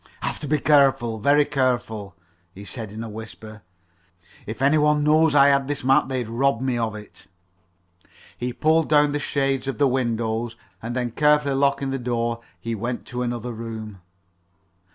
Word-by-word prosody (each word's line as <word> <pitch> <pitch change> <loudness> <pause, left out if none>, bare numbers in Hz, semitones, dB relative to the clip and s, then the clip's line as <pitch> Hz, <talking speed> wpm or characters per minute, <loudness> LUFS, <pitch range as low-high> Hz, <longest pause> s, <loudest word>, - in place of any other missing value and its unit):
"Have - - -2
to 150 - -5
be 155 - +2
very - - -11
careful 135 -6 +3
very 145 +6 +4
careful," 120 -8 -1 0.4
he 100 +2 -10
said 110 -2 -6
in 110 +2 -6
a - - -6
whisper. 110 0 -10 0.9
"If 110 - -6
any 140 +3 +3
one 150 0 +3
knowed 155 0 +4
I 140 0 +7
had 140 -1 +2
this 145 -2 -3
map 135 +3 +3
they'd 130 -3 -3
rob 120 +2 +1
me 130 -1 -1
of 115 -2 -2
it." 105 -1 -12 1.1
He 125 +1 -3
pulled 160 +5 +2
down 150 -1 +4
the 145 - -1
shades 135 -2 -1
of 135 - -3
the 145 - +3
windows, 115 -2 -1 0.3
and 115 +2 -5
then 125 -2 -2
carefully 150 +1 +3
locking 140 0 +1
the 135 - -2
door 120 -1 -2 0.2
he 115 +6 -4
went 120 +3 -4
to 125 0 -4
another 120 0 -3
room. 110 -3 -7
125 Hz, 175 wpm, -23 LUFS, 115-140 Hz, 1.1 s, I